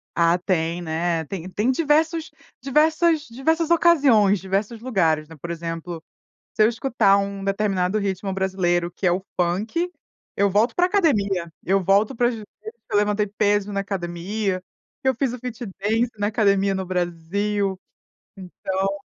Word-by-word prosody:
Ah, 170 +1 +3
tem, 175 -2 -1
né, 165 0 -1
tem 185 +2 -6
tem 215 +7 +1
diversos 320 +2 +1 0.3
diversas 310 +3 +2
diversas 320 +7 0
ocasiões, 270 - +5
diversos 200 +4 -2
lugares, 165 -10 +1
né, 160 - -12
por 170 - -6
exemplo, 165 0 -5 0.5
se 215 - +3
eu 215 - +6
escutar 225 -4 +2
um 200 0 -3
determinado 195 -1 0
ritmo 195 -1 -2
brasileiro, 180 -2 0
que 185 +2 -4
é 175 - +4
o 185 - -1 0.2
funk, 215 - 0 0.4
eu 200 0 +2
volto 215 +5 +2
pra 355 - +3
academia, 200 - +1
eu 195 +1 +1
volto 205 +6 +3
para 240 0 +3
as 245 - -2
vezes 215 -2 -9 0.2
que 220 - -6 0.2
eu - - +5
levantei 210 0 +2
peso 205 0 0
na 200 -1 -1
academia, 190 +1 -3 0.4
que 265 - +1
eu - - -2
fiz 250 0 -1
o - - -6
fit 245 -1 -6
dance 225 +4 +1
na 205 - +1
academia 200 -2 +2
no 190 -1 -3
Brasil, 185 +3 -1 0.6
então 190 +1 -3
200 Hz, 160 wpm, -23 LUFS, 180-230 Hz, 0.6 s, eu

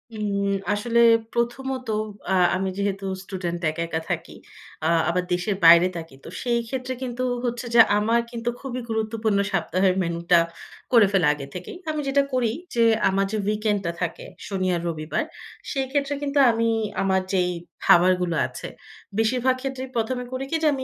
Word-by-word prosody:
উম 200 -1 -1 0.2
আসলে 235 +3 0 0.3
প্রথমত 255 +2 -2 0.5
আ - - +4 0.2
আমি 190 +1 -1
যেহেতু 200 -1 -2 0.2
স্টুডেন্ট 175 -3 -4
একা, 165 +2 -5
একা 160 -1 -2
থাকি, - - -4 0.5
আ - - +3 0.2
আবার 180 +1 0
দেশের 180 +3 0
বাইরে 170 +2 +9
থাকি। 160 -4 -8
তো - - -9
সেই 240 -2 +1
ক্ষেত্রে 260 0 -3
কিন্তু 250 0 -3 0.2
হচ্ছে 240 +1 -3
যে 235 - +10 0.2
আমার 225 +3 +2
কিন্তু 235 0 -3
খুবই 255 -2 -4
গুরুত্বপূর্ণ 220 -1 0
সপ্তাহের 185 +2 +1
মেনুটা 170 0 +2 0.5
করে 230 -5 +6
ফেলা 180 -6 +4
আগে 140 -2 -8
থেকেই। 180 - -7
আমি 305 -1 -1
যেটা 280 +1 +3
করি 245 -3 +1 0.2
যে, 235 - +4 0.3
আমার 195 +1 +1
যে 220 - -1
উইকেন্ডটা 210 -4 0
থাকে 170 -2 -3 0.2
শনি 190 -2 -1
আর 170 - -2
রবিবার, 155 -1 -2 0.5
সেই 270 -2 -1
ক্ষেত্রে 285 0 0
কিন্তু 285 0 0
আমি 230 0 +1 0.3
আমার 190 -1 +2
যেই 180 -1 +2 0.3
খাবারগুলো 180 -1 +4
আছে, - - -8 0.5
বেশিরভাগ 250 +3 +2
ক্ষেত্রেই 265 -1 -4
১ম 230 +3 0
এ - - -9
করি 260 +1 -3
কী, 325 - -1
যে - - +5
আমি 265 - -3
215 Hz, 165 wpm, -24 LUFS, 180-250 Hz, 0.5 s, যে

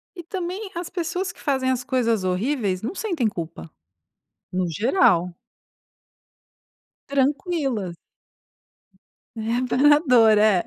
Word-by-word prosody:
E 345 - -8
também 370 +4 -5
as 345 0 -4
pessoas 355 +1 -3
que - - -21
fazem 265 -3 0
as 255 -1 -1
coisas 235 -6 0
horríveis 195 0 -1
não 235 - -4
sentem 350 - -1
culpa. 170 -4 -6 0.8
No 180 -1 0
geral. 180 - +2 1.7
Tranquilas. 275 - -1 1.4
É, - - -7
reparador 250 0 +4
é. 210 -4 +4
255 Hz, 100 wpm, -23 LUFS, 210-325 Hz, 1.7 s, reparador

